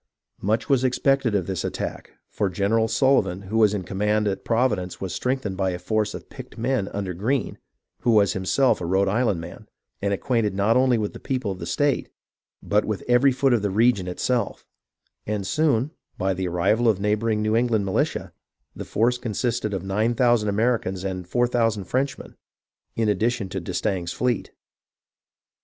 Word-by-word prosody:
Much 110 +4 0
was 135 -4 +3
expected 130 -2 +2
of 95 -4 +1
this 95 -2 -3
attack, - - -5
for 100 - -1
General 105 +4 +1
Sullivan 115 -5 +2
who 110 +4 -1
was 105 -2 +5
in 100 -3 -2
command 105 +3 0
at 100 - -2
Providence 110 -7 0
was 95 -2 -4
strengthened 125 -7 -2
by 95 -1 +1
a 90 - -3
force 105 +4 -1
of - - -9
picked - - -11
men 120 -3 0
under 100 -3 -4
Greene, 115 +7 -1 0.4
who - - -1
was 105 -4 +4
himself 95 +8 +2
a - - -2
Rhode 95 +2 +2
Island 105 -2 +1
man 80 - -10 0.3
and 100 0 0
acquainted 110 -1 0
not 100 +3 +2
only 130 -1 +4
with 105 -2 -2
the - - -9
people 125 -6 -2
of 95 - -6
the 85 - -6
state 145 -2 0 0.5
but 105 +1 +2
with 110 -2 -3
every 125 +3 +5
foot 130 0 +2
of 120 - +2
the 100 - 0
region 105 -2 +2
it 90 - -6
self; 120 -5 -1 0.6
and 105 -2 -2
soon, 150 -2 +1 0.3
by 95 0 0
the 95 0 -2
arrival 100 +7 +2
of 110 - +3
the 100 - -7
neighbouring 105 +1 +1
New 110 +1 +1
England 115 -3 +2
militia, 95 - -1 0.4
the - - -6
force 120 +3 +1
consisted 115 -1 -2
of 95 -3 -3
nine 105 +5 0
thousand 120 -3 +3
Americans 100 -3 0
and 90 -2 -4
four 120 +6 +2
thousand 115 -4 +1
Frenchmen, 130 +7 -3 0.6
in 115 -1 +1
addition 105 0 0
to 95 - -3
d'Estaing's 90 0 -2
fleet. 125 -2 -1
105 Hz, 185 wpm, -24 LUFS, 95-120 Hz, 0.6 s, was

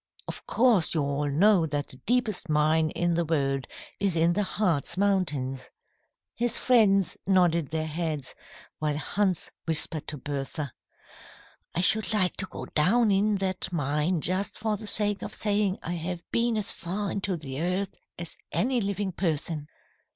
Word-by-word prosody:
"Of - - -7
course 225 -10 +3
you 155 - +2
all 140 +1 -1
know 175 +3 +4
that 145 -1 -3
the 130 - -7
deepest 225 -7 0
mine 155 +1 +3
in 175 +2 0
the 170 +1 +1
world 135 -4 0 0.3
is 195 -3 +1
in 165 +1 +3
the 205 - +1
Hartz 185 -7 -1
Mountains." 150 -10 0 0.6
His 240 0 +1
friends 205 -6 +3
nodded 175 -6 +3
their 160 0 -2
heads, 155 -3 -3 0.5
while 150 -1 -1
Hans 185 +2 -1
whispered 160 -1 +1
to 150 - -4
Bertha, 140 0 -4 1.0
"I 175 - +2
should 215 +3 +4
like 185 -4 +2
to 190 - -1
go - - -7
down 210 +8 +3
in 205 +2 +2
that 190 -1 -2
mine 150 +2 0
just 185 +5 -1
for 215 -1 -1
the 210 +1 -8
sake 205 -2 +3
of - - -5
saying 205 -2 +1
I 175 - -3
have 175 +1 -4
been 235 -1 +1
as 205 -2 +2
far 195 +4 -3
into 195 -2 -2
the 140 -2 -6
earth 185 +3 -1 0.2
as 170 -1 -7 0.2
any 250 0 +1
living 200 -1 -2
person." 160 -4 -2
175 Hz, 160 wpm, -27 LUFS, 155-200 Hz, 1.0 s, know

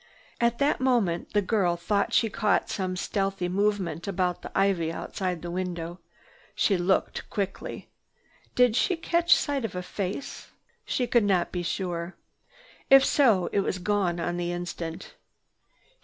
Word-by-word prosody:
At 235 0 +2
that 280 +3 +1
moment 230 -10 +1
the 205 -1 +3
girl 185 -4 +1
thought 200 +4 0
she 230 - +3
caught 210 -1 0
some 185 -2 -2
stealthy 195 0 -1
movement 195 -1 -1
about 180 -2 -1
the - - -8
ivy 190 -4 +2
outside 180 0 -4
the 175 - -4
window. 175 -1 -4 0.6
She 200 - +2
looked 180 +1 0
quickly. 200 -2 -4 0.6
Did 250 -3 +4
she 365 +8 +2
catch 340 +1 +3
sight 280 -3 -1
of 215 -5 -4
a 180 - -3
face? 195 +7 -5 0.4
She 250 - 0
could 240 -2 +3
not 185 -4 +1
be 180 - -2
sure. 175 0 -3 0.7
If 270 0 +8
so, 225 -11 +4
it - - +1
was 190 - -1
gone 185 -2 0
on 175 +1 -2
the 175 0 -2
instant. 175 -2 -5
190 Hz, 150 wpm, -27 LUFS, 175-215 Hz, 0.7 s, If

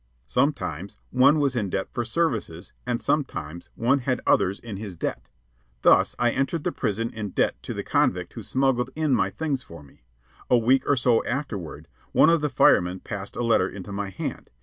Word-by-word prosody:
Sometimes 100 - -1
one 135 +4 +5
was 140 -3 +1
in 105 -5 -1
debt 95 +1 -2
for 120 - -1
services, 115 - -2
and 120 -1 0
sometimes 85 - -2
one 125 +5 +2
had 130 0 -1
others 95 +2 +3
in 110 -4 -7
his 100 -3 -6
debt. - - -4 0.5
Thus, - - +5
I 120 0 +2
entered 135 +5 -1
the - - 0
prison 115 +3 -2
in 110 -2 -4
debt - - 0
to - - -6
the - - -3
convict - - 0
who - - -7
smuggled 130 -2 +1
in 155 -3 +1
my 100 -5 +2
things 145 +3 -2
for 85 -9 -12
me. 70 - -20 0.5
A 125 - +6
week 130 +3 +3
or 145 - +5
so 120 -2 +2
afterward, 100 - -4 0.3
one 160 - +6
of 165 -2 +3
the 150 - 0
firemen 90 -8 +3
passed 100 -1 -7
a 120 - -2
letter 115 -5 +3
into 100 0 -8
my 100 0 -3
hand. 95 - -6
115 Hz, 195 wpm, -25 LUFS, 95-135 Hz, 0.5 s, A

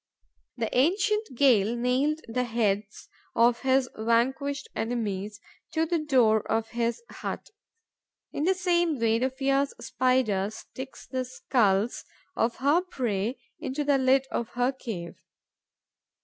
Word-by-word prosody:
The 230 -2 -2
ancient 400 - +2
Gael 235 -5 +4
nailed 260 +6 +1
the 250 +2 -1
heads 210 -3 -1 0.3
of 235 +1 +4
his 265 -1 +3
vanquished 260 +6 0
enemies 210 -3 -3 0.3
to 320 0 +2
the 335 +1 0
door 250 -8 +4
of 225 0 0
his 235 - -2
hut. - - -6 0.8
In 295 - -2
the 380 +1 +3
same 345 -4 +1
way, 230 -1 +2
the 260 +2 +1
fierce 275 +1 0
Spider 245 -6 +1
sticks 260 +4 -9
the 260 -1 -2
skulls 230 -4 +1 0.3
of 230 +1 +1
her 290 +6 +3
prey 240 - -2 0.2
into 295 -1 -2
the 285 -1 +3
lid 260 +1 +3
of 235 0 -2
her 245 +2 +1
cave. 220 -10 -7
250 Hz, 130 wpm, -27 LUFS, 225-280 Hz, 0.8 s, Gael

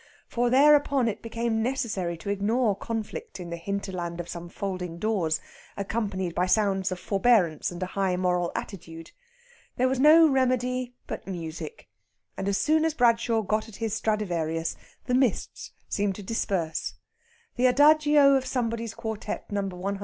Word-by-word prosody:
For 240 0 0
thereupon 280 -1 +5
it 215 -2 -3
became 230 0 -1
necessary 220 -9 -2
to 200 - -4
ignore 210 +2 +1
conflict 230 - -5
in 175 -1 -7
the - - -2
hinterland 175 -1 -4
of 175 - -5
some 170 0 -7
folding 180 -3 -4
doors, 175 -6 0 0.4
accompanied 200 -3 -2
by 180 +2 +1
sounds 195 -1 +2
of 185 - -4
forbearance 195 -6 +2
and 175 +1 -5
a - - 0
high 190 0 -1
moral 180 -1 0
attitude. 165 -4 -7 0.6
There 255 - +2
was 260 0 0
no 315 +3 +8
remedy 255 -2 0
but - - -7
music, 170 - -6 0.5
and 195 - -4
as 200 -1 +1
soon 310 +1 +2
as 320 -1 0
Bradshaw 230 -3 +2
got 215 +2 -1
at 215 - -12
his 225 -1 -3
Stradivarius 170 -8 -1 0.3
the 250 - -1
mists 255 -4 0 0.2
seemed 200 -1 -1
to 205 - -8
disperse. 185 -6 -2 0.6
The 255 0 +3
adagio 295 +1 +5
of 265 -1 +1
Somebody's 230 -3 -2
quartette 220 -2 -5
No. 200 -1 -1
215 Hz, 155 wpm, -27 LUFS, 185-250 Hz, 0.6 s, no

